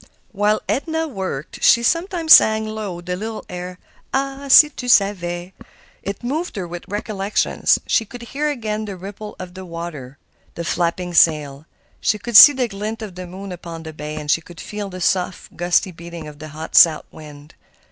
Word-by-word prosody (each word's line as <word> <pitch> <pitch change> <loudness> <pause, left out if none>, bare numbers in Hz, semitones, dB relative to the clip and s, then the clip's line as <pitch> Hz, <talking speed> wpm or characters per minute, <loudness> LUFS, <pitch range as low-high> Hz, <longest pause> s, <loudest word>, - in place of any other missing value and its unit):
While 210 +1 +1
Edna 320 +3 -1
worked 190 - -6
she 235 - +5
sometimes 335 - +3
sang 220 0 +6
low 215 -5 -5
the 180 +1 -4
little 220 +3 -6
air, 180 0 -7 0.3
"Ah! 275 +1 -2
si 300 +3 +8
tu 250 -4 -8
savais!" 185 -5 +1 0.5
It 200 +4 -6
moved 310 +8 -3
her 185 -3 -4
with 175 0 -8
recollections. 205 0 0
She 225 - +2
could 240 +3 -10
hear 290 +5 -2
again 215 -6 -3
the 200 -2 -6
ripple 200 +3 -9
of 180 -1 -9
the 190 +1 -9
water, 165 -6 -8 0.4
the 170 - -5
flapping 175 +1 -1
sail. 150 -3 +2 0.3
She 215 - +1
could 235 +2 -6
see 290 +8 +11
the 255 -2 -1
glint 215 +2 -5
of 205 -4 -8
the 180 0 -8
moon 190 +2 -9
upon 170 -2 -8
the 160 -1 -8
bay, 150 0 -7
and 150 -1 0
could 175 0 -14
feel 210 -1 -6
the 185 -1 -8
soft, 180 0 -1
gusty 175 +2 +1
beating 170 -1 -9
of 150 -1 -12
the 155 - -8
hot 155 +2 -8
south 160 -3 +6
wind. 150 -1 -13
190 Hz, 180 wpm, -20 LUFS, 170-220 Hz, 0.5 s, see